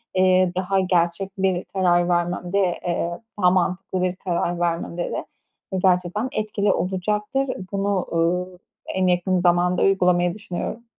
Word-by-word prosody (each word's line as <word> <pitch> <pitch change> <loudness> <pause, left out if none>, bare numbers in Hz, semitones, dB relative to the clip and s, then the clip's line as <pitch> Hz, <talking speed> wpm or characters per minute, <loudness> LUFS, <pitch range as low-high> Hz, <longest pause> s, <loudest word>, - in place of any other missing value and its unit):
eee, 185 -1 +4
daha 190 +1 +1
gerçek 180 +1 +1
bir 190 -1 +1
karar 175 -2 +2
vermemde, 175 +2 0 0.3
eee, 170 0 -2 0.2
daha 180 - +6
mantıklı 185 0 0
bir 185 0 0
karar 175 -1 -2
vermemde 170 0 -1
de - - -3 0.6
gerçekten 185 +5 +1
etkili 210 -4 0
olacaktır. 210 +8 -1 0.2
Bunu, 200 -1 0
uuu, 180 +2 0 0.4
en 190 -1 +2
yakın 180 +1 +2
zamanda 175 0 +2
uygulamayı 180 -2 +3
düşünüyorum. 210 +3 -5
180 Hz, 125 wpm, -23 LUFS, 175-195 Hz, 0.6 s, daha